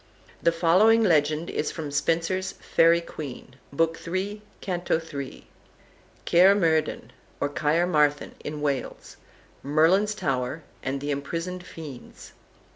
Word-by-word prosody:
The 170 - +4
following 185 +7 +4
legend 155 -3 +2
is 150 - -1
from 155 -3 -6
Spenser's 170 +5 0
"Faery 165 +1 +3
Queene," 135 -5 -9
Book 165 +3 0
III., 195 +4 -3 0.2
Canto 175 -3 -1
iii.: 140 -2 -6 0.8
CAER 185 +3 +6
MERDIN, 160 - 0 0.3
OR - - +1
CAERMARTHEN 150 0 +1
(IN 150 0 -5
WALES), 140 -4 -3 0.4
MERLIN'S 170 +9 +3
TOWER, 135 -2 -2 0.2
AND 135 +1 -3
THE 145 +1 -2
IMPRISONED 165 +6 -4
FIENDS. 155 -8 -11
165 Hz, 115 wpm, -26 LUFS, 145-180 Hz, 0.8 s, CAER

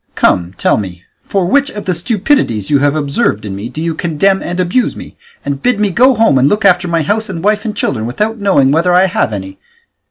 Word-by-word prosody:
Come, 90 +1 +1
tell - - +2
me, 95 -3 -6 0.2
for 195 -3 -1
which 285 +9 +2
of 205 -1 -8
the 185 - 0
stupidities 180 - 0
you 140 - +4
have 145 +1 +1
observed 140 -8 -1
in 100 -2 -5
me 105 +4 -6
do 150 - -8
you 165 -1 -1
condemn 180 +4 0
and 175 +1 -4
abuse 185 +8 0
me, - - -11 0.3
and 140 -1 -3
bid 250 -4 +1
me 210 -2 +1
go 255 +6 +4
home 220 - +3
and 135 +3 +3
look 210 0 0
after 180 -2 +3
my 165 -2 0
house 215 +7 -1
and 170 -3 -6
wife 210 +2 +1
and 215 -1 -4
children, 110 +1 -2
without 215 - -2
knowing 185 -10 +3
whether 170 +4 +2
I 185 +1 +5
have 190 - -1
any? 95 -2 -7
175 Hz, 230 wpm, -14 LUFS, 135-210 Hz, 0.3 s, I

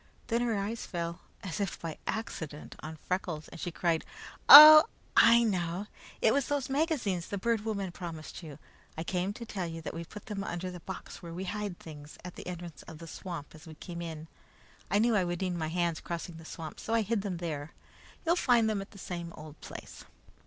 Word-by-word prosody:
Then 235 0 +1
her 235 -3 0
eyes 210 +4 -3
fell, 170 -2 -4 0.2
as 185 0 -4
if 200 -3 -2
by 165 -2 -6
accident, 160 -9 -5
on 160 +1 -7
Freckles, 170 -2 -3
and - - -11
she - - -2
cried, 165 -1 0 0.5
"Oh, 310 +2 +13 0.3
I 235 +1 +7
know 230 - +2
now! 175 +4 -3 0.4
It 220 - +5
was 280 -2 +1
those 280 -2 -1
magazines 270 - 0
the 200 - -3
Bird 225 +2 0
Woman 200 -4 -2
promised 170 -2 -7
you. 150 -5 -9 0.4
I 160 - -2
came 180 +2 -1
to 235 - -8
tell 190 -5 -4
you 165 0 -6
that - - -5
we 165 - -5
put 210 +4 -11
them 200 -2 -4
under 180 0 -4
the 180 - -8
box 190 +2 -8
where 170 -1 -8
we 185 - -4
hide 205 -1 -4
things, 150 -2 -11
at 180 - -7
the - - -10
entrance 175 -3 -7
to 160 - -9
the 165 +2 -10
swamp 165 -2 -7
as 155 +1 -14
we 160 - -10
came 170 +1 -7
in. 160 -2 -6 0.6
I 200 - +3
knew 225 +1 +3
I 195 - +3
would 175 -1 -2
need 185 -1 -1
my 160 -2 -2
hands 170 0 0
crossing 170 0 -5
the 165 - -12
swamp, 160 -1 -8
so 225 - -1
I 230 - +3
hid 220 0 0
them 195 -3 -3
there. 160 -3 -5 0.5
You'll 335 +1 +4
find 240 -7 +4
them 215 -2 0
at 195 - -9
the 200 - -15
same 170 -2 -6
old 155 0 -11
place." - - -10
180 Hz, 220 wpm, -30 LUFS, 165-210 Hz, 0.6 s, Oh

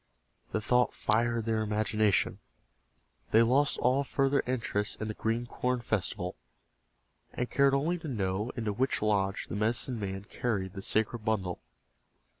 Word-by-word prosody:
The 110 - -1
thought 125 +3 +2
fired 115 +1 +1
their 110 -1 +1
imagination. 105 -1 +1 0.9
They 115 +1 +6
lost 135 +5 +3
all 130 +3 +2
further 135 +1 +1
interest 115 -4 -1
in 110 - -3
the - - -2
Green 115 +3 -1
Corn 125 +1 -1
Festival, 100 -5 -2 1.0
and 125 - -3
cared 140 -1 +4
only 165 +6 0
to 160 - -7
know 105 -3 -1
into 110 -3 -1
which 130 +1 0
lodge 100 -2 +1
the - - -5
medicine 115 +3 0
man 95 -1 -4
carried 100 -4 -2
the 95 - -6
sacred 110 +4 0
bundle. 95 -5 -1
110 Hz, 145 wpm, -30 LUFS, 105-125 Hz, 1.0 s, They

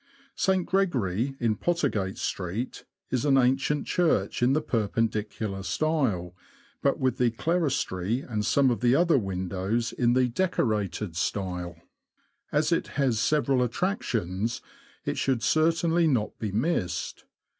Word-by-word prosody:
St. 190 -2 +1
Gregory, 135 - 0
in 115 -3 +1
Pottergate 135 - -1
Street, 100 +7 -4 0.3
is 130 -1 0
an 140 -2 +4
ancient 135 +3 +2
church 155 - +1
in 125 +2 +4
the 155 - +2
Perpendicular 110 -3 -1
style, 100 - 0 0.5
but 140 - +2
with 130 -3 0
the 125 -1 +4
clerestory 125 - -1
and 110 -6 -3
some 135 +4 +3
of 120 - -1
the 125 +1 +4
other 170 -3 +4
windows 95 +3 -2
in 120 -1 +2
the 130 0 +3
Decorated 110 - -1
style. 90 -1 -2 0.8
As - - +1
it - - +1
has 130 -6 +2
several 140 -1 +2
attractions, 115 - -1 0.5
it - - -2
should 130 -4 0
certainly 165 +1 +3
not 120 -8 0
be 110 -3 -3
missed. 100 - -2
120 Hz, 130 wpm, -27 LUFS, 100-145 Hz, 0.8 s, an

